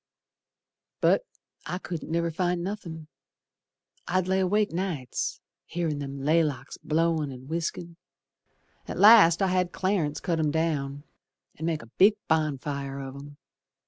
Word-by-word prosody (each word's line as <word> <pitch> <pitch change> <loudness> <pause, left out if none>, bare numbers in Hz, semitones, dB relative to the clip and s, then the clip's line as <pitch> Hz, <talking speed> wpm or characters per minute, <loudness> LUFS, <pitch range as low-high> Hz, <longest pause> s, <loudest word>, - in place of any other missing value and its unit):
But - - +3 0.4
I 180 - -2
couldn't 175 -4 -6
never 170 0 0
find 175 +1 -1
nothin'. 175 -5 -6 1.0
I'd 185 0 +1
lay 190 +1 +2
awake 205 +3 +2
nights 165 -8 -3 0.3
Hearin' 160 -3 -2
them 140 -1 -5
laylocks 145 -2 0
blowin' 160 -2 +1
and 130 0 -10
whiskin'. 170 +1 -4 0.9
At - - -5
last 200 -5 +7
I - - +3
had 180 -1 +1
Clarence 185 -6 0
cut 170 -3 -1
'em 155 -1 +2
down 145 -3 -1 0.5
An' 160 - -4
make 160 -6 -1
a 115 - -16
big 205 +3 +7
bonfire 140 -3 -1
of 135 -1 -6
'em. 145 +1 -11
165 Hz, 135 wpm, -27 LUFS, 145-180 Hz, 1.0 s, last